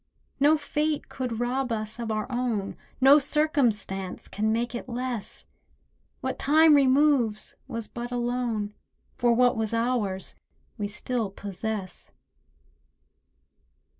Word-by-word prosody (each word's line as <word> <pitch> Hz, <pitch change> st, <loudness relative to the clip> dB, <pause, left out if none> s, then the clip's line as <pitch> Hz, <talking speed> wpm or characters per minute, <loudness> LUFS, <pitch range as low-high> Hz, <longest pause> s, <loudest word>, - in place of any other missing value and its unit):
No 295 Hz, +3 st, +5 dB
fate 300 Hz, 0 st, -1 dB
could 245 Hz, -4 st, -4 dB
rob 250 Hz, +1 st, -1 dB
us 215 Hz, 0 st, -3 dB
of 230 Hz, -2 st, -3 dB
our 215 Hz, -1 st, -1 dB
own— 240 Hz, -5 st, -1 dB, 0.2 s
No 275 Hz, +3 st, +8 dB
circumstance 245 Hz, -, 0 dB
can 215 Hz, +1 st, -1 dB
make 235 Hz, +2 st, -1 dB
it 240 Hz, -, -6 dB
less; 245 Hz, -3 st, -4 dB, 0.8 s
What 260 Hz, -2 st, -3 dB
time 310 Hz, +2 st, +6 dB
removes 270 Hz, -5 st, +3 dB
was 230 Hz, -4 st, -5 dB
but 240 Hz, 0 st, -6 dB
a 245 Hz, -, -1 dB
loan, 240 Hz, -4 st, -1 dB, 0.5 s
For 240 Hz, -1 st, +4 dB
what 250 Hz, +1 st, +4 dB
was 225 Hz, 0 st, -1 dB
ours 230 Hz, -5 st, -1 dB, 0.4 s
we 205 Hz, -3 st, -3 dB
still 220 Hz, +1 st, -2 dB
possess. 200 Hz, 0 st, -4 dB
240 Hz, 120 wpm, -27 LUFS, 215-260 Hz, 0.8 s, No